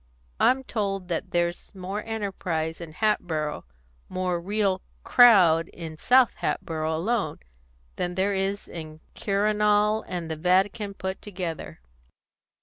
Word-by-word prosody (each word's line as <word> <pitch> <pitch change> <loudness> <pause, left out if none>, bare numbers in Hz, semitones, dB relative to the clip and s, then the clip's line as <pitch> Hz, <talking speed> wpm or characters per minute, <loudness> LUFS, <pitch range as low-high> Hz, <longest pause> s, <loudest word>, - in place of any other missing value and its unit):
I'm 265 +1 +3
told 195 -6 -3
that 170 - -2
there's 175 +2 -2
more 195 +3 -4
enterprise 185 -7 -3
in 165 -2 -8
Hatboro', 160 - -1 0.4
more 180 -2 -1
real 195 0 0 0.2
crowd 180 -9 +6
in 165 -2 -8
South 250 +7 +4
Hatboro' 160 -1 -2
alone, 210 +7 -1 0.6
than 180 0 -2
there 195 +2 +1
is 195 +1 -2
in 155 -2 -7 0.2
the - - -10
Quirinal 210 +1 +2
and 170 -3 -4
the 160 - -3
Vatican 195 +4 +1
put 190 0 -4
together." 165 - -6
190 Hz, 125 wpm, -26 LUFS, 165-210 Hz, 0.6 s, crowd